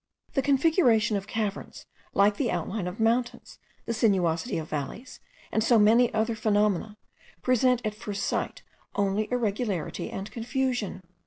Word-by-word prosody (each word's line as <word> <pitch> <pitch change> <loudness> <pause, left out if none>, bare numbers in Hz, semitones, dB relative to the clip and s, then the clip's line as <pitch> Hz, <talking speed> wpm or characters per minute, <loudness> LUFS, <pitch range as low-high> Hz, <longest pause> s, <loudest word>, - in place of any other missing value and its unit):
The 270 - +2
configuration 265 - +3
of 200 0 -3
caverns, 210 -2 -4 0.3
like 205 +1 +4
the 250 - 0
outline 180 +2 -2
of 180 +4 -6
mountains, 235 +2 0 0.3
the 230 - -2
sinuosity 190 -3 +1
of 160 -1 -4
valleys, 155 - -5 0.3
and 220 - +1
so 235 0 +4
many 230 +3 +5
other 220 +1 0
phenomena, 210 -1 +1 0.5
present 250 0 +3
at 215 - -1
first 205 -2 -5
sight - - -2 0.3
only 200 +1 0
irregularity 215 -7 -2
and 195 +2 -6
confusion. 245 -4 -2
220 Hz, 140 wpm, -27 LUFS, 200-245 Hz, 0.5 s, many